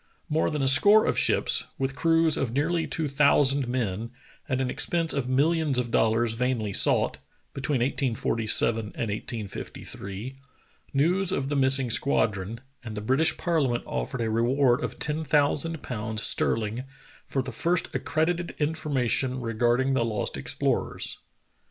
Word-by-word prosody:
More 155 Hz, +1 st, +1 dB
than 150 Hz, -3 st, -2 dB
a -, -, +2 dB
score 205 Hz, +12 st, +6 dB
of -, -, +1 dB
ships, -, -, +2 dB
with 135 Hz, 0 st, -2 dB
crews 165 Hz, -1 st, +3 dB
of 120 Hz, -4 st, -2 dB
nearly 160 Hz, +5 st, 0 dB
two 160 Hz, -2 st, -2 dB
thousand 140 Hz, -1 st, +3 dB
men, 115 Hz, -3 st, -2 dB, 0.4 s
at 130 Hz, -, 0 dB
an 130 Hz, -, 0 dB
expense 165 Hz, +5 st, 0 dB
of 135 Hz, -3 st, -2 dB
millions 150 Hz, +1 st, +2 dB
of 120 Hz, -2 st, -1 dB
dollars 115 Hz, +1 st, +2 dB
vainly 115 Hz, -4 st, -1 dB
sought, -, -, +2 dB, 0.3 s
between 135 Hz, -1 st, -1 dB
1847 115 Hz, -3 st, +1 dB
and 110 Hz, -, -5 dB, 0.3 s
1853, 105 Hz, +1 st, -7 dB, 0.5 s
news 175 Hz, +7 st, +2 dB
of 140 Hz, -7 st, -1 dB
the 145 Hz, -, -1 dB
missing 135 Hz, -2 st, +4 dB
squadron, 110 Hz, -3 st, 0 dB, 0.2 s
and 110 Hz, -3 st, -7 dB
the -, -, -1 dB
British 135 Hz, +9 st, +1 dB
ParHament 145 Hz, -9 st, 0 dB
offered -, -, -4 dB
a 110 Hz, -1 st, -1 dB
reward 125 Hz, +4 st, +2 dB
of -, -, -4 dB
ten 150 Hz, +2 st, -2 dB
thousand 150 Hz, +2 st, 0 dB
pounds 110 Hz, -2 st, -4 dB
sterling 115 Hz, +2 st, 0 dB, 0.4 s
for 135 Hz, -, -1 dB
the 130 Hz, -, -6 dB
first 170 Hz, +9 st, 0 dB
accredited 170 Hz, +2 st, -1 dB
information 140 Hz, -4 st, -1 dB
regarding 120 Hz, +3 st, +1 dB
the 130 Hz, -3 st, +2 dB
lost 110 Hz, -2 st, -2 dB
explorers. -, -, -2 dB
130 Hz, 145 wpm, -26 LUFS, 115-150 Hz, 0.5 s, score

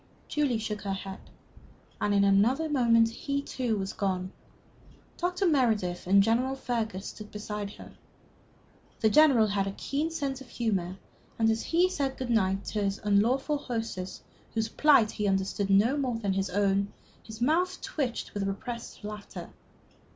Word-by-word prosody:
Julie 285 Hz, -6 st, +1 dB
shook 215 Hz, -2 st, -4 dB
her 195 Hz, -1 st, -2 dB
head, 195 Hz, 0 st, -6 dB, 0.8 s
and 205 Hz, -, +1 dB
in 200 Hz, -1 st, +4 dB
another 220 Hz, +11 st, +3 dB
moment 230 Hz, -6 st, +4 dB
he, 280 Hz, +5 st, -3 dB
too, 250 Hz, -5 st, -2 dB
was 195 Hz, -1 st, -3 dB
gone. 185 Hz, -2 st, -2 dB, 0.9 s
Dr. 360 Hz, +2 st, 0 dB
Meredith 220 Hz, -, +1 dB
and 195 Hz, +1 st, +6 dB
General 245 Hz, +5 st, +1 dB
Fergus 220 Hz, -7 st, -3 dB
stood 215 Hz, -1 st, -8 dB
beside 210 Hz, -1 st, -5 dB
her. -, -, -12 dB, 1.1 s
The 220 Hz, -2 st, +4 dB
General 280 Hz, -6 st, +6 dB
had 200 Hz, -1 st, 0 dB
a 195 Hz, -, -3 dB
keen 295 Hz, +4 st, -1 dB
sense 280 Hz, -5 st, -3 dB
of 260 Hz, -, -12 dB
humor, 190 Hz, -6 st, -1 dB, 0.4 s
and 225 Hz, -1 st, +3 dB
as 225 Hz, -, -1 dB
he 345 Hz, +2 st, +3 dB
said 280 Hz, -7 st, -2 dB
good 255 Hz, -2 st, -3 dB
night 195 Hz, -3 st, +1 dB
to 210 Hz, -, -2 dB
this 200 Hz, 0 st, -1 dB
unlawful 245 Hz, +8 st, +2 dB
hostess, 225 Hz, -8 st, -4 dB, 0.3 s
whose 225 Hz, 0 st, 0 dB
plight 265 Hz, -5 st, +4 dB
he 210 Hz, -, -2 dB
understood 195 Hz, +1 st, 0 dB
no 210 Hz, +7 st, +4 dB
more 260 Hz, -5 st, -1 dB
than 200 Hz, -4 st, -1 dB
his 195 Hz, 0 st, -1 dB
own, 200 Hz, +1 st, +1 dB, 0.3 s
his 220 Hz, -1 st, -10 dB
mouth 350 Hz, +9 st, +1 dB
twitched 260 Hz, -6 st, -3 dB
with 200 Hz, -1 st, -2 dB
repressed 235 Hz, +4 st, -6 dB
laughter. 210 Hz, 0 st, -7 dB
220 Hz, 160 wpm, -29 LUFS, 200-265 Hz, 1.1 s, and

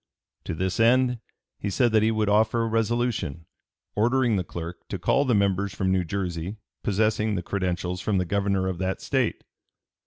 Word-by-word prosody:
To -, -, -3 dB
this 95 Hz, +4 st, -2 dB
end 125 Hz, +1 st, +4 dB, 0.4 s
he 100 Hz, -, -2 dB
said 120 Hz, +4 st, +2 dB
that 110 Hz, -1 st, +4 dB
he 110 Hz, -, +3 dB
would 110 Hz, -1 st, 0 dB
offer 110 Hz, +3 st, +3 dB
a -, -, 0 dB
resolution 115 Hz, -, -1 dB, 0.5 s
"ordering 120 Hz, +1 st, +2 dB
the 95 Hz, -, 0 dB
clerk 85 Hz, 0 st, -7 dB
to -, -, -4 dB
call 140 Hz, -, +2 dB
the 125 Hz, -4 st, +2 dB
members 100 Hz, 0 st, +1 dB
from 95 Hz, -1 st, 0 dB
New 95 Hz, -1 st, +2 dB
Jersey 90 Hz, +2 st, -3 dB, 0.2 s
possessing 105 Hz, +1 st, +1 dB
the 90 Hz, -, -2 dB
credentials 90 Hz, -1 st, -2 dB
from 105 Hz, 0 st, 0 dB
the 90 Hz, -, +1 dB
Governor 100 Hz, +1 st, 0 dB
of 90 Hz, -2 st, -3 dB
that 95 Hz, 0 st, -1 dB
State." 130 Hz, -4 st, -1 dB
100 Hz, 180 wpm, -26 LUFS, 95-115 Hz, 0.5 s, end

